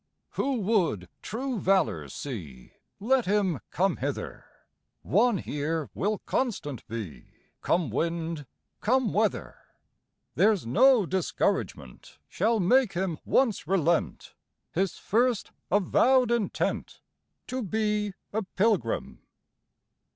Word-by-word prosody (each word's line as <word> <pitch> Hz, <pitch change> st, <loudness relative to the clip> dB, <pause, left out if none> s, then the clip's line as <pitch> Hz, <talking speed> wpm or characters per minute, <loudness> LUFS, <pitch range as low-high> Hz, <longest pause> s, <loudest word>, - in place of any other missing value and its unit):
"Who 275 Hz, -1 st, -1 dB
would 175 Hz, -, +1 dB
true 250 Hz, +1 st, -3 dB
valor 110 Hz, -, +1 dB
see, 80 Hz, -, -7 dB, 0.3 s
Let 245 Hz, +3 st, +2 dB
him 190 Hz, -, +1 dB
come -, -, +1 dB
hither; -, -, -4 dB, 0.6 s
One 220 Hz, -, +3 dB
here 155 Hz, 0 st, -3 dB
will 210 Hz, +3 st, 0 dB
constant 150 Hz, -, -2 dB
be, 110 Hz, -, -6 dB, 0.4 s
Come 165 Hz, -7 st, +1 dB
wind, 165 Hz, +1 st, -2 dB, 0.3 s
come 250 Hz, 0 st, +1 dB
weather; 215 Hz, +1 st, 0 dB, 0.7 s
There's 205 Hz, -, +3 dB
no 235 Hz, -, +5 dB
discouragement 165 Hz, -, -2 dB
Shall 220 Hz, +4 st, +1 dB
make 220 Hz, +3 st, +3 dB
him 175 Hz, -3 st, -2 dB
once 230 Hz, -, +1 dB
relent 170 Hz, -2 st, 0 dB, 0.4 s
His 190 Hz, +1 st, -1 dB
first 235 Hz, +1 st, +1 dB, 0.2 s
avowed 240 Hz, +5 st, +3 dB
intent 235 Hz, -4 st, -1 dB, 0.5 s
To 255 Hz, +1 st, -3 dB
be 210 Hz, -1 st, -1 dB, 0.2 s
a 220 Hz, -, 0 dB
pilgrim. 195 Hz, -, -1 dB
195 Hz, 100 wpm, -27 LUFS, 160-225 Hz, 0.7 s, no